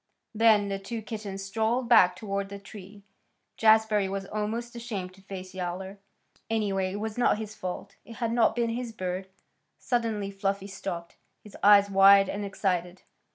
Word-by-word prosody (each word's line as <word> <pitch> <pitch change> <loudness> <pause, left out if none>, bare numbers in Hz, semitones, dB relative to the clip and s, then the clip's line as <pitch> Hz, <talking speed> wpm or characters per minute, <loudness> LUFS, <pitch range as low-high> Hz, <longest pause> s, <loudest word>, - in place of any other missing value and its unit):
Then 215 -2 +4
the 195 0 -2
two 220 +3 -6
kittens 205 -3 -6
strolled 225 +5 0
back 180 -6 +6
toward 200 -1 -4
the 200 - -7
tree. 200 0 -12 0.5
Jazbury 220 -2 +4
was 195 0 -4
almost 220 +4 -4
ashamed 210 -6 -5
to 195 - -18
face 185 -1 -8
Yowler. 190 +2 -5 0.5
Anyway, 195 -4 0
it 205 - -4
was 220 +2 -4
not 240 - +3
his 215 -1 -6
fault. 185 -4 -6
It 230 - -11
had 230 -1 -2
not 230 -1 +3
been 235 -1 0
his 240 0 -4
bird. 185 -2 -4 0.5
Suddenly 225 -5 -1
Fluffy 195 0 -2
stopped, 175 -3 -6 0.3
his 210 - -13
eyes 200 0 +6
wide 195 0 +7
and 205 - -3
excited. 185 -2 -2
200 Hz, 160 wpm, -27 LUFS, 195-220 Hz, 0.5 s, wide